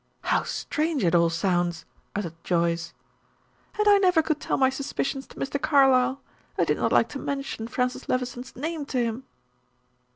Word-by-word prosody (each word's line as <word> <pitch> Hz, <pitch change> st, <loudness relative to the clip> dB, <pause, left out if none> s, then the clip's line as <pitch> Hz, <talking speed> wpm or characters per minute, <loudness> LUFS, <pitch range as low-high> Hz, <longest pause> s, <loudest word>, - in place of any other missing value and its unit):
"How -, -, +2 dB
strange 310 Hz, -4 st, -2 dB
it 170 Hz, -1 st, +2 dB
all 170 Hz, -1 st, +4 dB
sounds!" 175 Hz, 0 st, 0 dB, 0.3 s
uttered 190 Hz, -6 st, -3 dB
Joyce. 170 Hz, -1 st, 0 dB, 0.9 s
"And 425 Hz, 0 st, +2 dB
I 405 Hz, -1 st, +7 dB
never 360 Hz, -4 st, +4 dB
could 310 Hz, -1 st, -1 dB
tell -, -, -1 dB
my 265 Hz, -1 st, +4 dB
suspicions 270 Hz, 0 st, -3 dB
to -, -, -16 dB
Mr. 280 Hz, +1 st, -3 dB
Carlyle! 270 Hz, -3 st, +4 dB, 0.4 s
I -, -, +3 dB
did -, -, +1 dB
not -, -, 0 dB
like -, -, +4 dB
to 285 Hz, -, -6 dB
mention 275 Hz, -6 st, -4 dB
Francis 250 Hz, +1 st, -2 dB
Levison's 250 Hz, 0 st, -3 dB
name 310 Hz, +4 st, -3 dB
to 260 Hz, -, -3 dB
him." 235 Hz, +1 st, -1 dB
260 Hz, 165 wpm, -26 LUFS, 200-285 Hz, 0.9 s, I